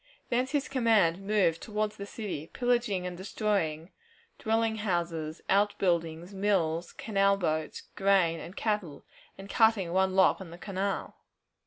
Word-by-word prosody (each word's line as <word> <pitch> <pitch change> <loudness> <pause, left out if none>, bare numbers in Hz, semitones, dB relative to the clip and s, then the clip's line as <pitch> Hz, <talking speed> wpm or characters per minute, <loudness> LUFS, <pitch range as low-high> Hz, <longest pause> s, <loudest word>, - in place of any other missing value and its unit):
Thence 250 +2 +1
his 285 -1 -1
command 220 -9 +2
moved 195 -5 +1
toward 215 -1 -2
the 200 -1 -8
city, 195 -9 -5
pillaging 240 -7 0
and 180 -1 -4
destroying 185 -4 -2 0.5
dwelling 225 0 +1
houses, 170 -6 -2
out 205 +1 +2
buildings, 170 0 -1
mills, 180 -4 0
canal 200 -2 +1
boats, 155 -4 -2
grain, 190 -4 +3
and 170 +5 -9
cattle, 210 -10 -2 0.3
and 195 - -9
cutting 210 -5 +3
one 190 0 +2
lock 190 0 +4
on 185 - -8
the 170 - -10
canal. 195 +1 -3
195 Hz, 140 wpm, -29 LUFS, 170-215 Hz, 0.5 s, lock